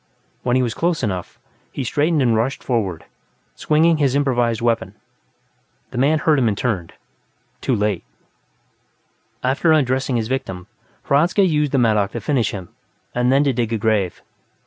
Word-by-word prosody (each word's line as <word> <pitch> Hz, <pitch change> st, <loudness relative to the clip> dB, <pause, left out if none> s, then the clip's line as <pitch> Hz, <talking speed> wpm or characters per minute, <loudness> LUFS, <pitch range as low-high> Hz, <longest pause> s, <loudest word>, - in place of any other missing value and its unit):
When 125 Hz, 0 st, 0 dB
he 130 Hz, -, +3 dB
was 120 Hz, -3 st, -1 dB
close 170 Hz, -1 st, -1 dB
enough, 95 Hz, -5 st, -3 dB, 0.3 s
he 135 Hz, -, -4 dB
straightened 150 Hz, +4 st, +1 dB
and 120 Hz, -3 st, +3 dB
rushed 120 Hz, +5 st, -1 dB
forward, 95 Hz, -10 st, -2 dB, 0.5 s
swinging 160 Hz, +2 st, +2 dB
his 140 Hz, -3 st, +1 dB
improvised 120 Hz, -5 st, +1 dB
weapon. 115 Hz, -1 st, -1 dB, 1.0 s
The -, -, -3 dB
man 145 Hz, +4 st, +3 dB
heard 150 Hz, -1 st, +2 dB
him 120 Hz, -, +2 dB
and 105 Hz, -2 st, 0 dB
turned, 100 Hz, -10 st, -2 dB, 0.7 s
too 130 Hz, -, +1 dB
late. 105 Hz, -4 st, -1 dB, 1.4 s
After 135 Hz, +6 st, +2 dB
undressing 130 Hz, -3 st, +1 dB
his 115 Hz, -2 st, -1 dB
victim, 115 Hz, -9 st, -4 dB, 0.4 s
Hradzka 170 Hz, +8 st, +3 dB
used 150 Hz, -5 st, +1 dB
the 140 Hz, -, +1 dB
mattock 105 Hz, -5 st, +2 dB
to -, -, -3 dB
finish 135 Hz, -7 st, 0 dB
him, 95 Hz, -4 st, -7 dB, 0.4 s
and 125 Hz, +1 st, +1 dB
then 135 Hz, +2 st, +4 dB
to 140 Hz, -2 st, +1 dB
dig 115 Hz, -2 st, -1 dB
a -, -, +1 dB
grave. 105 Hz, -4 st, 0 dB
125 Hz, 160 wpm, -20 LUFS, 110-145 Hz, 1.4 s, then